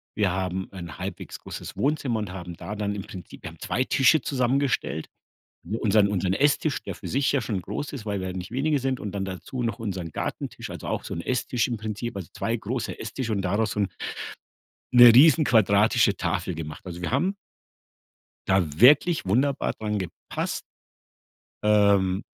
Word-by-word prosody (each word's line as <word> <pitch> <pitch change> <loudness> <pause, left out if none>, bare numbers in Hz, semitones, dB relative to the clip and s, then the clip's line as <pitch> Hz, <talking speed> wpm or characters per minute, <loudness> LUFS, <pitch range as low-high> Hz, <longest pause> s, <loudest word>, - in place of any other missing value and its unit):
wir 100 -4 +2
haben 95 0 -2
ein 85 -4 -8
halbwegs - - -6
großes - - -8
Wohnzimmer 140 -4 0
und 105 -4 -4
haben 90 -2 -7
da 100 - -7
dann 105 -1 -2
im 100 - -5
Prinzip 90 -3 -11
wir - - -5
haben - - -17
2 130 - 0
Tische 135 +3 +4
zusammengestellt, 130 - 0 0.8
unseren 105 -1 +4
unseren 95 -2 0
Esstisch, 145 +5 +1
der - - -5
für - - -8
sich 135 +1 +1
ja 140 -4 +1
schon 100 -4 -2
groß 105 +12 -5
ist, 115 -6 -7
weil 100 -2 -2
wir 95 - -3
ja - - -4
nicht 90 0 -6
wenige 145 +3 +1
sind 130 0 -1
und 105 - -5
dann 95 -1 -2
dazu 95 +7 -5
noch 115 +1 -2
unseren 95 -7 -4
Gartentisch, - - -5
also, - - -7
auch - - -2
so - - -6
'n 85 - -3
Esstisch 125 +1 0
im 120 - -2
Prinzip, 110 +1 -5
also, 95 -5 -6
2 115 +1 -1
große 115 +3 -4
Esstisch 115 +2 -4
und 100 -3 0
daraus 105 +4 0
so 105 - -2
'n 100 - +1 1.0
'ne 120 -1 +10
riesenquadratische 115 - +5
Tafel 90 - -2
gemacht. 80 +2 -7
Also, 90 -1 -7
wir 85 - -2
haben 175 +10 +1 1.1
da 95 0 +4 0.2
wirklich 150 - +6
wunderbar 135 +8 +1
dran 105 -1 -3
gepasst. 90 -3 -4 1.0
Ähm, 100 -2 +3
105 Hz, 180 wpm, -25 LUFS, 95-130 Hz, 1.1 s, ne